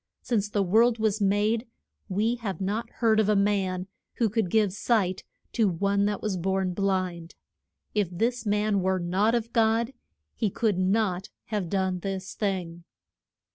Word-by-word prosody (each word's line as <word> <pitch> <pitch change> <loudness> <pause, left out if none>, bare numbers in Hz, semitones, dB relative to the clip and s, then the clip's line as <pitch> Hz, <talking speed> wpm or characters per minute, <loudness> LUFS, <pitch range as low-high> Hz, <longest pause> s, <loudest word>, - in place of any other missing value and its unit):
Since 210 -4 0
the 205 -1 +1
world 225 +5 +4
was 215 -1 0
made 210 +4 +1 0.4
we 210 +5 +1
have 205 -5 -4
not 205 +4 -2
heard 220 -2 +2
of 215 -1 +2
a 210 - +4
man 195 -2 +1 0.3
who 230 -3 +1
could 220 -4 0
give 210 -1 +2
sight 195 -4 0 0.3
to 220 -4 +3
one 200 +3 +1
that 205 -1 -2
was 205 -3 -1
born 190 +1 0
blind. 185 -3 -2 0.6
If 205 -4 +1
this 230 +7 -1
man 210 -1 +1
were 190 +1 +1
not 190 +6 +1
of 235 0 -2
God 230 +2 +2 0.4
he 220 - 0
could 205 -2 0
not 190 -1 +1 0.2
have 205 -6 -2
done 190 -1 0
this 190 0 -4
thing. 180 -5 -3
200 Hz, 160 wpm, -27 LUFS, 185-220 Hz, 0.6 s, world